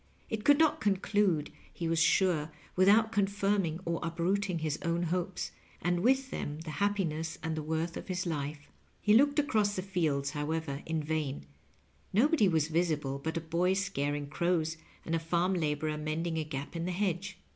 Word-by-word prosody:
It 215 -1 -2
could 290 +3 +6
not 320 -1 +3
conclude^ 195 -5 +1 0.2
he 170 - -4
was 165 0 +1
sure, 165 -3 +3 0.3
without 210 +4 +5
confirming 200 -4 +1
or 170 0 -1
uprooting 180 +3 0
his 155 -2 -2
own 170 +1 0
hopes, 180 +2 -2 0.3
and 175 0 +1
with 265 +5 +2
them 145 +1 -4
the 160 -1 -6
happiness 165 -6 0
and 160 0 -1
the 155 - -2
worth 160 +2 -2
of - - -7
his 185 -1 -2
life« 145 -2 -3 0.3
He 210 - +3
looked 285 +6 +5
across 215 -8 +2
the 185 - -2
fields, 155 -8 0
however, 150 -1 -3
in 160 -1 -1
vain, 150 - -2 0.7
K'obodj 255 - +4
was 160 -3 +2
visible 155 -5 0
but 160 +1 -2
a - - -1
boy 170 +3 +1
scaring 145 -7 -1
crows, 160 +1 0 0.3
and 165 - -3
a 165 - +2
farm 170 +3 +1
laborer 155 -2 -1
mending 160 +2 -2
a - - 0
gap 140 +1 -6
in 165 0 -2
the 180 - -1
hedge. 190 0 -2
170 Hz, 175 wpm, -31 LUFS, 155-195 Hz, 0.7 s, could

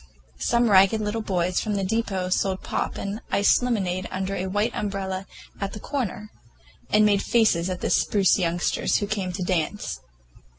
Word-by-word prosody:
Some 235 -2 +2
ragged 195 +3 +6
little 215 +1 -2
boys 180 -3 0
from 215 -2 -2
the 195 - -1
depot 195 -3 -1
sold 190 0 0
pop - - -2
and 200 +3 -4
iced 200 - +4
lemonade 190 -7 -1
under 190 +1 -3
a 185 0 -2
white 205 +5 0
umbrella 195 -2 -3 0.3
at 195 -1 -3
the 210 - -6
corner, 215 -5 -4 0.6
and 215 0 +4
made 205 -1 +3
faces 210 -7 +2
at 180 -1 -4
the - - -1
spruce 200 -1 +3
youngsters 175 -1 +1
who 205 - -1
came 200 -3 -2
to 180 +1 -4
dance. 180 +2 -2
195 Hz, 170 wpm, -24 LUFS, 185-215 Hz, 0.6 s, ragged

